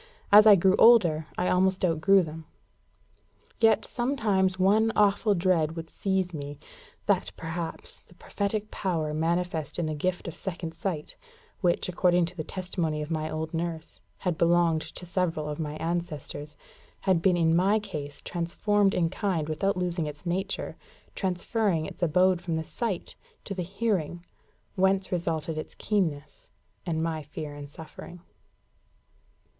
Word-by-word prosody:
As 210 +1 +9
I 210 - +10
grew 190 +1 +4
older, 170 -10 +6
I 180 - +1
almost 185 +1 +2
outgrew 180 +3 +4
them. 160 0 -8 1.1
Yet 225 -1 +4
sometimes 215 -8 0
one 210 +4 +4
awful 205 0 +3
dread 170 -3 +1
would 165 -1 -7
seize 190 -2 -1
me 145 -1 -6 0.5
that, - - +2
perhaps, 165 0 -6
the 175 - -20
prophetic 205 +4 -3
power 160 -6 -1
manifest 165 -1 -1
in 175 - 0
the 155 - -2
gift 180 +5 -2
of 170 - -4
second 170 -3 -5
sight, 165 -2 -4 0.4
which, 175 -3 +1
according 180 -1 +3
to 175 +2 -7
the 160 - -4
testimony 165 -4 -3
of 150 - -7
my 155 -1 -1
old 160 +1 -4
nurse, 165 -1 -4 0.2
had 180 -4 -2
belonged 170 -1 +3
to 180 - -7
several 170 -4 -1
of 150 +1 -4
my 150 -1 -3
ancestors, 155 -3 -4 0.5
had 185 -4 +2
been 180 0 +3
in 165 -1 +3
my 195 +5 +4
case 150 -9 -6
transformed 195 +4 +1
in 170 -2 +2
kind 175 -4 -1
without 195 +5 0
losing 175 -3 -1
its 150 +3 -9
nature, 190 +3 -2 0.4
transferring 185 -2 0
its - - -9
abode 180 +2 +3
from 170 -2 -2
the 160 - -1
sight 200 +1 -4 0.3
to 200 - -5
the 185 - -3
hearing, 180 -3 -2 0.5
whence 190 0 +2
resulted 165 -3 -1
its - - -8
keenness, 160 -9 -2 0.4
and 160 -1 0
my 160 -1 -2
fear 150 0 -7
and 145 -1 -9
suffering. 160 +3 -10
175 Hz, 150 wpm, -27 LUFS, 160-190 Hz, 1.1 s, I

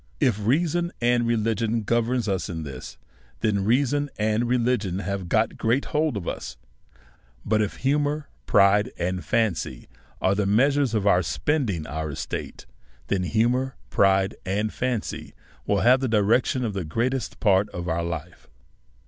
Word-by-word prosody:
If 115 -7 +1
reason 170 +8 +1
and 120 0 +2
religion 115 0 0
govern 120 +3 +1
us 95 -3 -1
in 80 -3 -4
this, 70 -4 -8 0.4
then 105 -3 +1
reason 140 +6 +1
and 110 +2 +1
religion 120 -6 0
have 100 -2 -4
got 110 +3 +1
great 120 +5 +1
hold 150 -6 +1
of 90 - -6
us; - - -5 0.9
but 110 +1 +2
if 105 - -2
humour, 145 +1 +1 0.2
pride, 100 +4 +4
and 90 0 -2
fancy 85 - -1 0.3
are 95 - +2
the 100 0 0
measures 135 +3 +2
of 105 -2 0
our 90 -3 +4
spending 95 - -1
our 80 +2 -4
estates, 70 - -6 0.4
then 100 -2 +1
humour, 120 +7 +1 0.2
pride, 95 0 +3
and 105 +3 -1
fancy 125 -3 -3 0.3
will - - +2
have 125 +3 +5
the 130 - -1
direction 115 +4 +2
of 110 - -2
the 95 -2 -3
greatest 120 +10 -2
part 100 -1 +3
of 85 0 -6
our 85 0 -1
life. 85 0 -6
110 Hz, 150 wpm, -25 LUFS, 95-125 Hz, 0.9 s, have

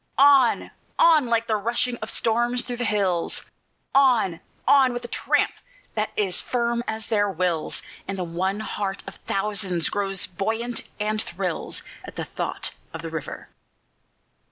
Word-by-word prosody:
On! 275 -3 +5 0.3
on! 315 -6 +6
like 230 -1 +2
the 220 - +1
rushing 240 +3 +1
of 220 0 -5
storms 240 +2 +2
through 245 -1 -4
the 245 - -1
hills; 190 -6 0 0.5
On! 240 -11 +4 0.3
on! 265 -3 +6
with 245 0 -4
a - - -4
tramp - - +1 0.4
that 215 0 0
is 195 -4 +1
firm 235 -1 0
as 220 0 -2
their 205 -2 +2
wills; 175 -3 -1 0.2
And 195 0 -3
the 185 - -1
one 185 +5 -1
heart 200 -2 -3
of - - -9
thousands 195 -4 0
grows 195 -2 0
buoyant, 225 +6 -3
and 215 +1 0
thrills, 180 -3 -3 0.2
At - - -10
the - - -3
thought - - -3 0.2
of 165 - -6
the 165 - -5
river. 160 -3 -6
215 Hz, 155 wpm, -25 LUFS, 190-240 Hz, 0.5 s, on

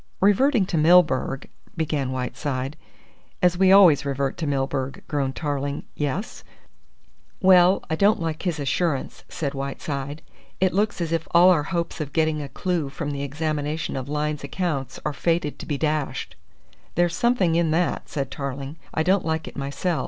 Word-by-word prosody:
"Reverting 210 +3 +4
to 170 -3 -1
Milburgh," 155 -5 +3 0.3
began 150 -5 -1
Whiteside. 130 +2 -3 0.6
"As 180 -1 +3
we 190 +1 +4
always 185 -7 +7
revert 140 -1 -1
to 160 - -3
Milburgh," 135 -1 -2
groaned 135 -3 -1
Tarling. 145 -2 -2
"Yes?" 150 - -3 1.0
"Well, 185 0 +5
I 160 - -1
don't 200 +5 +3
like 160 -2 -3
his 175 -5 -2
assurance," 145 +1 -1
said 145 -5 -3
Whiteside. 140 +2 -4 0.4
"It 185 -1 +2
looks 205 0 0
as 165 -1 -2
if 165 -1 -1
all 180 +2 +8
our 165 -5 +3
hopes 170 -2 -2
of 145 -2 -5
getting 155 -2 +1
a 140 - -6
clue 175 -5 -2
from 145 +1 -4
the 140 -1 -4
examination 150 +1 -2
of 130 +1 -4
Lyne's 150 0 -2
accounts 145 -9 -3
are 150 - 0
fated 165 -1 -1
to - - -8
be 145 - -1
dashed." 150 -1 -2 0.6
"There's 175 0 +2
something 235 -9 +2
in 165 -1 +2
that," 170 +3 0
said 140 -2 -3
Tarling. 140 +2 -5 0.2
"I 160 - +2
don't 185 +2 +2
like 160 0 -2
it - - -9
myself. 140 +5 -2
155 Hz, 165 wpm, -24 LUFS, 140-175 Hz, 1.0 s, all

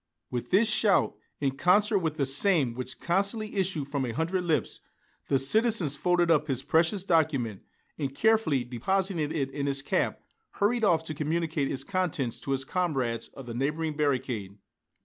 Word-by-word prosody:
With 120 -1 -4
this 205 +5 +4
shout, 210 -2 +3 0.2
in 135 -1 -1
concert 200 +5 +4
with 160 -3 -2
the 140 - +1
same 140 - +2
which 130 +1 -6
constantly 200 +5 -1
issued 180 -7 -1
from 140 -2 -1
a 125 - -2
hundred 175 +5 -1
lips, 160 -3 0 0.5
the 135 - +3
citizen 215 - +3
folded 175 +4 +1
up 150 -1 +3
his 135 -2 -1
precious 170 +6 +2
document, 145 - +1 0.4
and 135 -2 -3
carefully 220 - +2
depositing 185 - -1
it 140 -4 -2
in 140 0 -3
his 135 -1 -1
cap - - 0 0.3
hurried 225 +3 +1
off 170 -6 +3
to 155 - -4
communicate 155 -1 -1
its 135 - -3
contents 175 - -2
to 135 - -5
his 135 0 0
comrades 135 -10 -1
of 135 - -9
the 120 - -6
neighboring 150 +5 -2
barricade. 130 -9 -1
155 Hz, 170 wpm, -28 LUFS, 135-185 Hz, 0.5 s, this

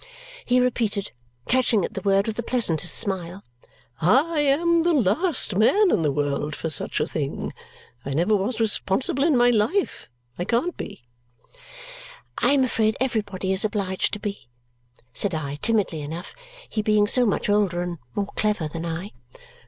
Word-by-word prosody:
he 250 +1 +3
repeated, 225 -5 0 0.4
catching 235 -6 +2
at - - -7
the - - -4
word 195 0 +2
with 220 - -3
the 235 - -2
pleasantest 175 - +1
smile. 190 +1 -1 0.6
"I 285 - +3
am 330 +4 +3
the 345 +1 +2
last 255 - +1
man 370 - +4
in - - +2
the 150 -3 +1
world 145 +1 -2
for 165 - -4
such 140 - -2
a - - +1
thing. 145 -4 -4 0.5
I - - -6
never 180 +7 +2
was 210 +4 -2
responsible 225 +4 +1
in 305 -4 +3
my 245 0 +5
life 235 - 0 0.3
I - - 0
can't 245 - 0
be." - - -8 1.4
"I - - +3
am 275 -2 +4
afraid 220 -3 +1
everybody 205 -7 -1
is 190 - +2
obliged 200 -3 -1
to 210 - -2
be," 205 - -6 0.6
said 195 -5 -1
I 145 -2 -4
timidly 195 -4 0
enough, 160 +5 -7 0.3
he 215 - -2
being 210 -1 +3
so 245 +3 +2
much 205 - 0
older 200 -4 +1
and 175 -2 -5 0.2
more 200 0 -2
clever 210 -7 0
than 165 +2 -5
I. 170 +5 -5
205 Hz, 165 wpm, -24 LUFS, 175-245 Hz, 1.4 s, my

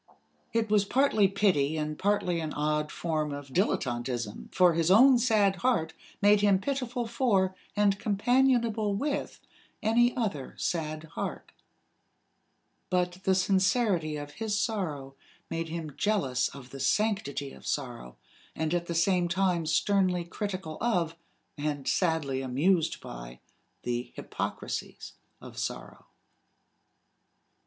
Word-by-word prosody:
It 225 -1 0
was 210 -2 +5
partly 220 -2 +3
pity 180 -7 +1
and 155 0 -2
partly 185 -2 +1
an 155 -2 -4
odd 150 0 0
form 155 -3 -2
of 140 -1 -7
dilettanteism 120 - -1
for 180 -2 +5
his 165 0 +1
own 250 +6 +7
sad 210 -5 +3
heart 170 -8 +1 0.3
made 205 0 +6
him 200 -2 +5
pitiful 250 +1 -2
for 215 -6 +1 0.2
and 205 -1 +2
companionable 230 -1 +2
with 285 +7 -2 0.4
any 240 +3 +3
other 195 - -3
sad 155 -2 -2
heart; 160 +1 -6 1.4
but 180 -1 0
the 190 - +4
sincerity 190 -3 +2
of 145 0 -6
his 210 +5 -2
sorrow 165 - -2 0.4
made 165 0 -2
him 160 -3 -5
jealous 135 -13 +1
of 130 -2 -11
the 135 - -8
sanctity 140 -4 0
of - - -12
sorrow, 120 - -4 0.4
and 160 +1 -1
at 175 -1 -1
the 170 - -3
same 175 +1 +2
time 175 -2 +1
sternly 180 +2 +2
critical 185 -3 -5
of, 175 -9 +1 0.4
and 145 -2 -2
sadly 160 -7 +1
amused 155 +6 +1
by, - - -9 0.4
the 120 0 -3
hypocrisies - - -5 0.3
of - - -10
sorrow. - - -6
180 Hz, 125 wpm, -29 LUFS, 150-210 Hz, 1.4 s, own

